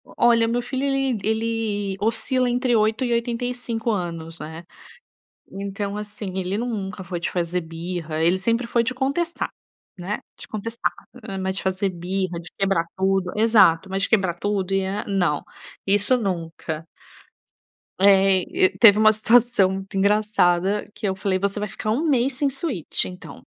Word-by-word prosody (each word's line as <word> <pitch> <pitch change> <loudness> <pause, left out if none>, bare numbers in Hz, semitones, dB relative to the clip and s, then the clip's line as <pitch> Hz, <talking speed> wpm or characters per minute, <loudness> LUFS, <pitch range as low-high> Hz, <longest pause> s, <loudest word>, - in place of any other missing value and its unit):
Olha 235 -1 +3
meu 240 +1 0
filho 260 +2 -3
ele 270 -3 +1
ele 220 -3 -1
oscila 235 +4 +1
entre 245 0 +1
8 220 +3 +2
e 240 - 0
85 235 -1 -2
anos, 165 -4 -4
né, 160 +2 -8 0.8
então, 200 +1 -4
assim, 205 -2 -5
ele 190 +1 -1
nunca 200 -6 -4
foi 175 -1 -4
de - - -2
fazer 175 0 -1
birra, 165 -1 -5
ele 170 +3 +3
sempre 230 +5 0
foi 235 0 +2
de 235 - -2
contestar, 285 +7 -1 0.5
né, 190 +4 -3 0.2
de - - -9
contestar, 225 +2 -2 0.4
hã, 195 -3 -5
mas 190 0 -2
de - - -3
fazer 190 +1 0
birra, 180 0 -3
de 170 0 -11
quebrar 195 -4 +1
tudo 190 -1 +1
exato, 205 -6 +4
mas 195 +1 -1
de - - 0
quebrar 190 -5 +2
tudo 195 0 -2
e 195 0 +1
a 200 +2 -3
não, 175 -7 0 0.4
isso 205 +5 +3
nunca. 165 -5 -4 1.1
Eh, 195 -1 +5 0.2
e - - -5
teve 210 -3 +8
uma 215 0 +6
situação 220 -2 +4
muito 195 0 -6
engraçada, 200 -1 +2
que 215 - -3
eu 190 - -1
falei: 190 -1 -1
"Você 200 +2 -1
vai 210 0 -3
ficar 215 +1 -3
1 290 +9 0
mês 265 0 +2
sem 280 +2 0
Switch, 270 - -2
então". 180 0 -10
200 Hz, 165 wpm, -23 LUFS, 185-230 Hz, 1.1 s, teve